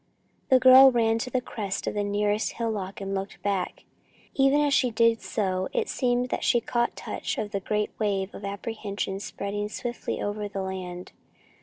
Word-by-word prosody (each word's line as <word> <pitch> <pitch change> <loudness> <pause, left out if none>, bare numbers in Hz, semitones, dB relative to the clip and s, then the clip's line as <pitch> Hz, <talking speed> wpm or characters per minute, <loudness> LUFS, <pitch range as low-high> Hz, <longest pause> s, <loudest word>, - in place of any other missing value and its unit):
The 260 - +7
girl 260 +1 +9
ran 225 -2 +2
to 255 - -3
the 255 0 0
crest 205 -5 -4
of - - -2
the 205 - -1
nearest 205 +1 0
hillock 210 -5 -3
and 195 0 -4
looked 195 0 -4
back. 200 -2 -2 0.5
Even 275 +1 +4
as 290 -1 +2
she 255 - +3
did 230 0 +3
so, 190 -3 -1
it 470 -3 0
seemed 245 -1 0
that - - -2
she 240 - +4
caught 240 +1 -1
touch - - -4
of 210 -1 -3
the 200 - -1
great 210 +2 -1
wave 200 -2 -1
of - - -9
apprehension 200 -1 -4
spreading 205 +1 -4
swiftly 240 +2 -4
over 205 0 -3
the 195 -1 -4
land. 185 -1 -6
210 Hz, 180 wpm, -26 LUFS, 200-240 Hz, 0.5 s, girl